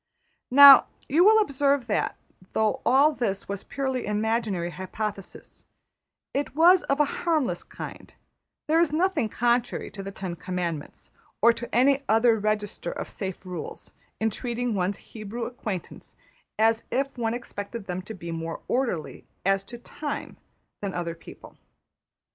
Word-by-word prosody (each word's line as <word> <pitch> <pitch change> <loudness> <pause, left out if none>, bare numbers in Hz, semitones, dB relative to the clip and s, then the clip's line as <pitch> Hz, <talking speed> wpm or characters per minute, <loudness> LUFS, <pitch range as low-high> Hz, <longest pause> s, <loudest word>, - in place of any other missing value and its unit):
Now 280 +1 +10 0.2
you 320 +6 +4
will 435 +2 +7
observe 280 - +1
that, 215 - -1 0.4
though 220 -1 +1
all 275 +5 +5
this 205 -8 -2
was 200 -1 -4
purely 265 -4 -3
imaginary 210 -4 -1
hypothesis, 195 +2 -7 0.7
it 280 0 -2
was 350 +4 +6
of 275 +1 0
a 295 - +5 0.2
harmless 315 -7 0
kind; - - -9 0.6
there 320 +2 +3
is 335 -3 +3
nothing 320 - +1
contrary 240 +2 0
to 195 - -7
the 195 - -6
ten 190 -3 -6
commandments, 175 -4 -5 0.3
or 235 +1 +6
to 235 +1 -7
any 270 +3 +4
other 225 +1 +4
register 210 -4 -2
of - - -6
safe 190 -1 -6
rules, 180 -3 -7 0.3
in 220 0 +1
treating 240 +1 -2
one's 190 0 -1
Hebrew 220 +2 -7
acquaintance 215 -7 -6 0.4
as 225 +1 +3
if 275 +2 -1
one 225 0 0
expected 225 -2 -7
them 180 -1 -4
to 215 +4 -8
be 170 -2 -7
more 165 0 -5
orderly 240 - -2 0.2
as 195 0 +2
to 240 - -9
time 290 +4 -6 0.4
than 200 -2 -4
other 170 -1 -2
people. 165 - -14
225 Hz, 145 wpm, -26 LUFS, 195-270 Hz, 0.7 s, Now